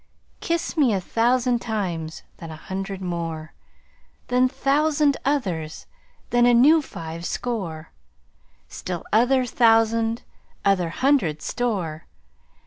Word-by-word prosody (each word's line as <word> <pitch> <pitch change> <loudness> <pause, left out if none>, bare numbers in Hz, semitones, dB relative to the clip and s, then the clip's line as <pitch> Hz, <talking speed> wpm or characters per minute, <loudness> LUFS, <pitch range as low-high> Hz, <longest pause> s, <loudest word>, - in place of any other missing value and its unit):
Kiss 335 0 -2
me 275 -8 +3
a - - 0
thousand 240 +5 +1
times, 175 -8 -3
then 165 - -9
hundred 190 +4 -6
more, 165 -3 -4 0.8
Then 250 +1 +3
thousand 290 +2 +2
others, 185 - -2 0.5
then 240 0 +4
a 245 - +5
new 300 +7 +6
five 165 - -8
score, 175 -8 -4 0.8
Still 175 - -6
other 250 +4 +4
thousand 225 -1 +3 0.4
other 190 -4 +2
hundred 215 - +1
store. 185 -11 -2
225 Hz, 105 wpm, -23 LUFS, 170-250 Hz, 0.8 s, new